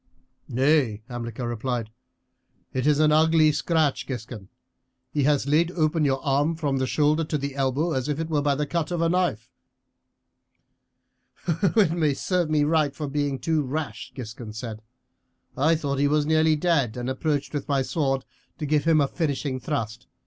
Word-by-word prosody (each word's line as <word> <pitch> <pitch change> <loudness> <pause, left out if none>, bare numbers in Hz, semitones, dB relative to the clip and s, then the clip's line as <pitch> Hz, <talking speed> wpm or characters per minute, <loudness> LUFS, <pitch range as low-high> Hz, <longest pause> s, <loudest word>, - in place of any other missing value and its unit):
"Nay," 130 -4 +2
Hamilcar 120 0 -5
replied, 120 -1 -3 0.8
"it 130 +2 0
is 150 -1 +4
an 155 0 +4
ugly 155 0 +5
scratch, 155 -1 0
Giscon; 110 -6 -7 0.6
he 145 -3 +1
has 145 -2 +2
laid 155 +4 +3
open 155 -1 +1
your 135 -1 +1
arm 145 +4 +2
from 145 -4 -1
the 130 0 0
shoulder 150 +6 +2
to 155 - -1
the 140 -1 -4
elbow 135 +5 0
as 130 -1 -1
if 150 0 -1
it 165 - -2
were 155 -3 0
by 145 -1 +1
the 150 +1 -1
cut 165 +1 -2
of 175 -1 -2
a 165 0 +2
knife." 165 -11 0 2.0
"It 170 -4 +2
served 180 -1 0
me 155 -1 +3
right 155 -2 +1
for 150 - -4
being 140 -1 -1
too 160 +2 0
rash," 135 -4 -4
Giscon 115 -3 -7
said. 110 -1 -6 0.7
"I 160 +5 +3
thought 140 -3 -2
he 145 - +3
was 150 0 +2
nearly 155 0 +3
dead, 150 -8 +1
and 125 0 -4
approached 145 +3 -1
with 145 -2 -3
my 140 -2 +2
sword 135 -2 -1 0.3
to 155 - -4
give 150 0 +1
him 165 -2 +4
a 140 - +3
finishing 140 -4 -2
thrust. 110 -3 -4
145 Hz, 170 wpm, -25 LUFS, 130-155 Hz, 2.0 s, ugly